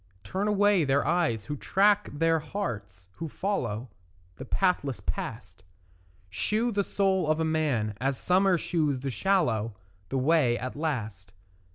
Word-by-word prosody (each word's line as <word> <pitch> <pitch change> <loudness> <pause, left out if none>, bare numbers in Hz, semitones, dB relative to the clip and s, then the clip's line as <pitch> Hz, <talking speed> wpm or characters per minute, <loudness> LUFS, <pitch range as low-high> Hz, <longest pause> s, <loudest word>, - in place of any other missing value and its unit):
Turn 195 +3 -2
away 205 -3 +3
their 140 0 +2
eyes 155 -11 +1
who 145 - -4
track, 205 +7 +2
their 165 +2 +2
hearts 105 - -5
who 165 -1 -5
follow, 125 - -3 0.5
The - - -7
pathless 175 - 0
past; - - -5 0.7
Shew 215 - 0
the 200 -2 +1
soul 190 -4 +1
of 155 0 +2
man, 145 -10 0
as 135 0 0
summer 185 0 +3
shews 150 -6 0
the 135 0 -2
swallow, 120 - +1 0.3
The 135 - -1
way 130 -3 +3
at 130 +1 -5
last. 110 - -4
155 Hz, 140 wpm, -28 LUFS, 120-190 Hz, 0.7 s, away